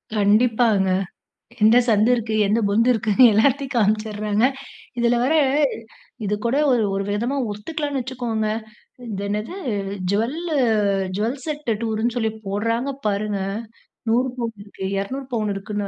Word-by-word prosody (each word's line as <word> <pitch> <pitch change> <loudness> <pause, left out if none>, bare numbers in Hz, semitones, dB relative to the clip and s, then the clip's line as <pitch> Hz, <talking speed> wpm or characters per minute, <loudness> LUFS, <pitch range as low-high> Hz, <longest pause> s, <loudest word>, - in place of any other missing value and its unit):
கண்டிப்பாங்க. 215 -1 +3 0.7
எந்த 220 +3 +7
சந்து 215 +1 +4
இருக்கு, 225 -2 -3
எந்த 215 +3 +2
பொந்து 230 +4 +3
இருக்குன்னு 225 +1 +4
எல்லாத்தையும் 275 +5 +2
காம்ச்சறாங்க 215 0 +1 0.5
இதில 235 0 +3
வேற 270 +5 +2 0.9
இது 205 +1 0
கூட 235 +3 +1 0.2
ஒரு 240 -3 +3
ஒரு 195 - -1
விதமா 235 +7 -1 0.2
ஒத்துக்கலாம்னு 285 +6 -3
வச்சுக்கோங்க, 240 -4 -2 0.6
இது 200 -1 -4
என்னது 210 - -3 0.6
ஜுவலு 295 +11 -1 0.6
ஜுவல் 230 +6 -1
செட் 300 -4 -4
டூருன்னு 225 +2 -1
சொல்லி 220 -2 0 0.2
போட்றாங்க 230 +6 -1 0.2
பாருங்க 205 0 -1 0.7
100 250 +3 +2
பவுனு 230 -4 -4
இருக்கு 205 -1 -10
200 260 +8 -3
பவுனு 215 -3 0
இருக்குன்னு. 205 +1 -4
225 Hz, 125 wpm, -22 LUFS, 210-245 Hz, 0.9 s, எந்த